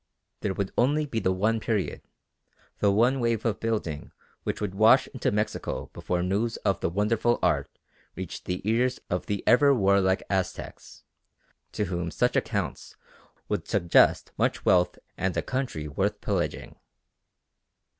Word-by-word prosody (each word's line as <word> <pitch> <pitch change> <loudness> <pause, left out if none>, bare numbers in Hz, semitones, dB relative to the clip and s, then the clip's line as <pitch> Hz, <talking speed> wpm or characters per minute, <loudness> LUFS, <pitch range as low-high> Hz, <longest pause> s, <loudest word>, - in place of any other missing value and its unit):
There 95 -2 -2
would 100 0 -2
only 145 +5 +3
be 120 -6 -2
the 95 - +1
one 110 +5 +1
period, 110 -4 -2 0.8
the 100 - +3
one 120 +6 +3
wave 115 -2 0
of 110 -3 0
building 105 -10 -3 0.3
which - - -3
would 105 -3 -3
wash 115 +6 +5
into 130 - -1
Mexico 105 +1 -2
before 90 -1 -2
news 105 +5 0
of 100 -3 +2
the - - 0
wonderful 105 +5 +1
art - - 0 0.4
reached - - -7
the 90 +2 -4
ears 125 +3 +1
of 90 - -2
the 100 -2 -2
ever 140 +3 +5
warlike 95 -3 +3
Aztecs, 95 -2 -4 0.7
to 105 - -1
whom 85 -2 -3
such - - 0
accounts - - -2 0.5
would - - -2
suggest 85 -1 +3
much - - 0
wealth 90 -1 +3 0.2
and 95 -1 -1
a - - 0
country 130 - -3
worth 70 - -1
pillaging. - - -3
105 Hz, 145 wpm, -27 LUFS, 95-115 Hz, 0.8 s, wash